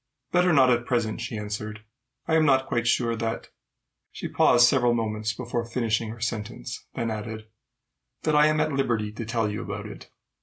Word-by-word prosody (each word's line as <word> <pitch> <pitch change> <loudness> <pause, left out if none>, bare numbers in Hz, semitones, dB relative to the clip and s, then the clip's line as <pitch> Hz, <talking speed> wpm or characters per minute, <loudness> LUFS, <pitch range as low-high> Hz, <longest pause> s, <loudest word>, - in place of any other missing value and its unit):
"Better 180 0 +4
not 130 -5 +5
at 120 0 +1
present," 115 -2 0
she 120 -2 -4
answered. 105 +1 -5 0.4
"I - - 0
am 160 -1 +5
not 135 -3 +4
quite 120 -2 -1
sure 115 -1 +2
that" 115 0 -3 0.6
She - - -5
paused 120 0 +5
several 125 -2 +3
moments 110 -1 -1
before 120 +1 -3
finishing 115 -1 -1
her 115 +1 -8
sentence, 115 +1 -5
then 115 -3 -1
added, 110 0 -5 0.4
" 125 0 -49
that 155 -1 +2
I 150 0 +6
am 155 0 +2
at 155 -1 +1
liberty 120 -6 0
to 115 +2 -6
tell 115 -1 0
you 105 - -4
about - - -5
it." - - -10
120 Hz, 190 wpm, -26 LUFS, 110-125 Hz, 0.6 s, I